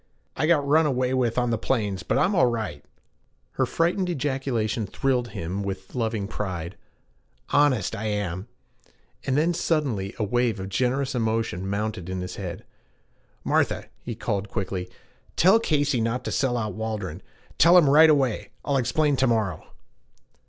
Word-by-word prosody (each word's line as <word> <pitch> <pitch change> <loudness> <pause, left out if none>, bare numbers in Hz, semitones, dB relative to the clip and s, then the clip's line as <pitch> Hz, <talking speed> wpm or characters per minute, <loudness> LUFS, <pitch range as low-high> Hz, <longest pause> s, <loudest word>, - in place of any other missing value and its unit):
'I 155 - 0
got 150 -4 +3
run 155 +2 +4
away 130 -2 0
with 125 -3 0
on 125 -1 +1
the 115 - 0
plains, 105 -7 -1
but - - 0
I'm 195 - +2
all 130 -9 +4
right 110 -12 -3 0.4
' - - -43
Her - - 0
frightened 180 +2 0
ejaculation 130 - -1
thrilled 125 +3 0
him 90 -1 -4
with 95 -1 -5
loving 110 -4 -1
pride 95 -5 -4 0.7
'honest 145 -9 +2
I 110 - -5
am.' 100 -2 -2 0.8
And 135 0 +2
then 165 +3 +2
suddenly 130 - -1
a 110 - -1
wave 120 0 0
of 95 0 -5
generous 130 +6 0
emotion 110 -5 -1
mounted 105 -2 -3
to 95 - -4
his 90 0 -5
head. 95 +1 -6 0.8
'Martha,' - - 0
he 120 - -5
called 105 -3 -2
quickly, 95 -4 -3 0.5
'tell 190 +6 +5
Casey 145 - +1
not 120 +3 -1
to - - -2
sell 125 -3 +1
out 110 -3 -2
Waldron 105 -6 -4 0.4
tell 170 +2 +7
him 165 -5 +6
right 155 +3 +7
away. 135 -7 +1 0.2
I'll 140 -1 +1
explain 140 +3 +1
to 130 - +3
morrow.' 110 -6 -1
115 Hz, 160 wpm, -25 LUFS, 100-140 Hz, 0.8 s, tell